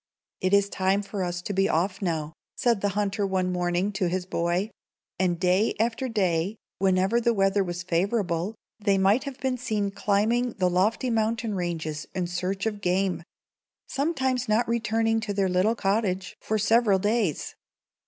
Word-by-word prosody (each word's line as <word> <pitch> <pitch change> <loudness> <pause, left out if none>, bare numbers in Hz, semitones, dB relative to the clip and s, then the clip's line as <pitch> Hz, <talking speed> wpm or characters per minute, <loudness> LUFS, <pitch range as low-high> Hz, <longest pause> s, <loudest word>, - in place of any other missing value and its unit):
] - - -56
"It 185 - +1
is 200 0 +4
time 195 +1 0
for 200 -1 -4
us 180 0 -3
to 205 - -3
be 195 0 +2
off 185 +4 0
now," 160 -4 -2 0.2
said 235 -5 +1
the 205 - +1
hunter 205 0 0
one 190 -2 0
morning 180 +2 0
to 195 -3 -1
his 180 +1 -2
boy; 180 +4 -1 0.5
and 175 -2 +1
day 185 +4 +2
after 235 +3 0
day, 190 -3 0 0.2
whenever 190 +4 +2
the 235 -1 +2
weather 195 0 +3
was 175 0 -4
favorable, 185 +1 0 0.3
they 200 -2 +3
might 200 +8 +3
have 275 -2 -6
been 255 -1 -1
seen 210 -4 -1
climbing 215 +5 +1
the 180 -2 +1
lofty 215 +8 +1
mountain 225 0 0
ranges 165 -4 -3
in 185 -2 0
search 180 +3 -2
of 210 -2 -2
game, 185 -1 0 0.7
sometimes 265 -5 -1
not 225 +3 +2
returning 225 -1 +1
to 215 -2 -4
their 195 -1 +2
little 185 +5 +2
cottage 195 -3 -1
for 220 - -1
several 215 -1 +4
days. 205 -4 0
195 Hz, 170 wpm, -26 LUFS, 180-225 Hz, 0.7 s, is